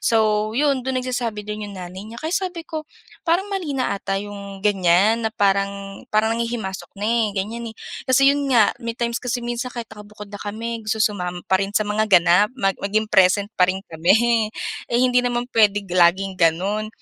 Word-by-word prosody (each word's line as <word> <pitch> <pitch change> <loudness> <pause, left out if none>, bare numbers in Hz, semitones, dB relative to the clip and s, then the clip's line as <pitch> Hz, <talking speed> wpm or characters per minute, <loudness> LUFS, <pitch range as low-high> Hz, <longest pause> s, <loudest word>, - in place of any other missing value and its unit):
So, 215 -1 +2
'yon, 280 -2 +2
do'n 260 +1 -2
nagsasabi 235 -5 -3
do'n 210 0 -5
'yong 200 - -9
nanay 180 0 -8
niya, 230 - -10
kaya 315 +2 -3
sabi 365 -3 -2
ko, 310 -1 -6 0.4
parang 350 +4 +3
mali 330 -8 -3
na 255 -5 0
'ata 195 -1 -2
'yong 200 -1 -7
ganyan 200 +2 +3
na - - -16
parang 200 0 0
parang 215 +1 +2
nanghihimasok 230 -4 -3
na 205 - -4
eh, 230 0 +2
ganyan 230 +4 -3
eh. 220 - -12 0.3
Kasi 275 +2 +5
'yon 285 -1 -2
nga, 235 -5 +4
may 230 -1 -4
times 235 0 -2
kasi 245 -1 -3
minsan 240 +1 -3
kahit 240 -2 -6
nakabukod 210 -1 -12
na 205 - -7
kami, 225 +3 -4
gusto 220 +1 -2
sumama 180 -4 -3
pa 190 0 +2
rin 200 +1 -2
sa 215 - +2
mga 215 +1 0
ganap, 180 +1 +5
mag 195 -5 +1
maging 215 +2 0
present 200 +2 +4
pa 180 - +6
rin 190 +1 -2
kami. 220 +7 +3 0.4
Eh 235 - 0
hindi 250 -1 +4
naman 245 -1 -1
puwedeng 205 -2 +3
laging 185 +2 +3
gano'n. 190 +6 +1
215 Hz, 195 wpm, -22 LUFS, 195-235 Hz, 0.4 s, pa